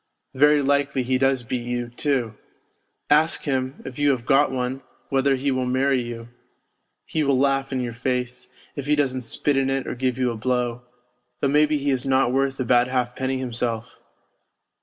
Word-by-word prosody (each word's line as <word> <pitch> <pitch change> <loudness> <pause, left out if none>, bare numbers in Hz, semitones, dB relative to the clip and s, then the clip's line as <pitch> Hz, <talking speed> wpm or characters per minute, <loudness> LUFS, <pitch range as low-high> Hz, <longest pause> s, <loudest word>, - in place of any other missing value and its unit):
Very 145 +2 +4
likely 140 -1 +1
he 130 +1 0
does 135 -1 +2
beat 120 +1 -3
you, 120 -1 -2
too. 125 -3 -1 0.8
Ask 155 +2 +3
him, 130 -1 -2
if 135 +1 -8
you 145 0 +3
have 125 -4 0
got 140 +1 +4
one, 130 +1 -2 0.3
whether 135 0 +2
he 135 +2 -1
will 130 -1 -1
marry 130 +1 +2
you. 120 -1 -7 0.8
He 160 - -2
will 140 -2 +2
laugh 135 0 +1
in 130 -1 -1
your 120 -2 -4
face, 125 +1 -3 0.3
if 140 -1 -5
he 150 - +3
doesn't 130 -3 0
spit 140 +4 -1
in 135 0 +1
it 135 0 -1
or - - -3
give 125 0 -1
you 125 -2 +1
a - - -5
blow 125 +1 -1 0.6
though 140 - +1
maybe 150 +1 +3
he 140 0 0
is 130 -2 0
not 130 -2 +2
worth 135 0 0
a 130 - -1
bad 120 +1 +4
halfpenny 130 +1 -1
himself. 120 -3 -3
130 Hz, 185 wpm, -23 LUFS, 125-140 Hz, 0.8 s, Very